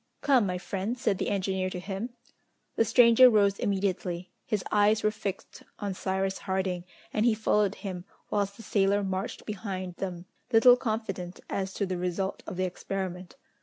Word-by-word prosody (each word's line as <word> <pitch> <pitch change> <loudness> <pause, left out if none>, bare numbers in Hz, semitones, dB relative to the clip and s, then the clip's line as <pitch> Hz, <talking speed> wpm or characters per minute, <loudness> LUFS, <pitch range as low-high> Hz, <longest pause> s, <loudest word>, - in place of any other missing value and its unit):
"Come, 260 -7 +4
my 180 -1 -1
friend," 195 +6 -3
said 205 -6 0
the - - -1
engineer 190 -1 0
to 185 - -5
him. 195 +5 -4 0.7
The - - +4
stranger 235 +2 +7
rose 200 -3 +3
immediately. 185 -3 -1 0.2
His 210 -3 -1
eyes 210 +1 +4
were 215 - +3
fixed 200 -2 -6 0.2
on 200 -2 -3
Cyrus 190 +1 -1
Harding, 190 -2 -2 0.3
and 215 - +1
he 235 -2 +4
followed 210 -2 +2
him, 185 -3 -6 0.3
whilst 200 -1 0
the 225 - -10
sailor 200 -1 +2
marched 190 0 -3
behind 185 -4 -5
them, 180 -2 -5 0.3
little 245 +1 +8
confident 215 -7 -3
as 190 -1 -2
to 200 - 0
the 185 -1 -3
result 180 +2 -2
of 180 - -5
the 185 - +1
experiment. 185 0 -5
195 Hz, 165 wpm, -28 LUFS, 185-215 Hz, 0.7 s, little